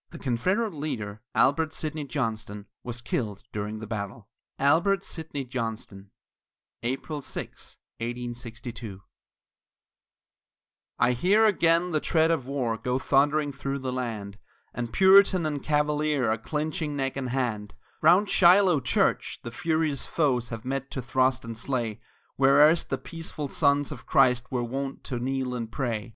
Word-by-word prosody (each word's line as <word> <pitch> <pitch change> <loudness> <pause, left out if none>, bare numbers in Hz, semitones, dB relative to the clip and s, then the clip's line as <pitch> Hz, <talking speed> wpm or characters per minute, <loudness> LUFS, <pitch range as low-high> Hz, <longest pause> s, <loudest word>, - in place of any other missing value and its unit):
The 170 - -10
Confederate 185 - 0
leader, 110 -9 -5
Albert 155 +3 +3
Sidney 155 -1 -4
Johnston, 110 -6 -3 0.2
was 120 0 -5
killed 105 -5 -3
during 105 +1 -3
the 110 - -7
battle. 105 -1 -5 0.3
ALBERT 170 +8 +3
SIDNEY 155 -4 -5
JOHNSTON 115 -5 -5 0.7
[April 135 +5 -3
6, - - -7 0.2
1862] 120 -3 -6 2.0
I 125 - +3
hear 195 - +3
again 175 -3 +3
the 155 - +1
tread 160 +1 +2
of 140 -6 -1
war 125 -5 -1
go 125 0 -1
thundering 145 +2 +2
through 140 0 -3
the 130 -2 -4
land, 110 -5 -4 0.3
And 120 -1 -4
Puritan 190 - +6
and 145 -2 -2
Cavalier 150 -4 +1
are 110 - +1
clinching 155 - -3
neck 135 -1 -2
and 135 -2 -3
hand, 115 -5 -2 0.3
Round 180 +6 +5
Shiloh 180 -3 +5
church 125 - 0
the 115 - -6
furious 155 0 0
foes 130 -7 +1
have 115 -1 -7
met 135 +1 -3
to 130 - -5
thrust 130 0 +1
and 115 0 -6
slay, 115 -2 -3 0.4
Where 140 +2 +7
erst 165 +2 +1
the - - 0
peaceful 160 -4 -6
sons 145 0 +2
of 120 -5 -9
Christ 125 -2 +3
were 125 -2 0
wont 135 +3 -4
to 125 - -4
kneel 130 0 -2
and 115 -2 -4
pray. 120 -3 -2
135 Hz, 145 wpm, -27 LUFS, 120-155 Hz, 2.0 s, Where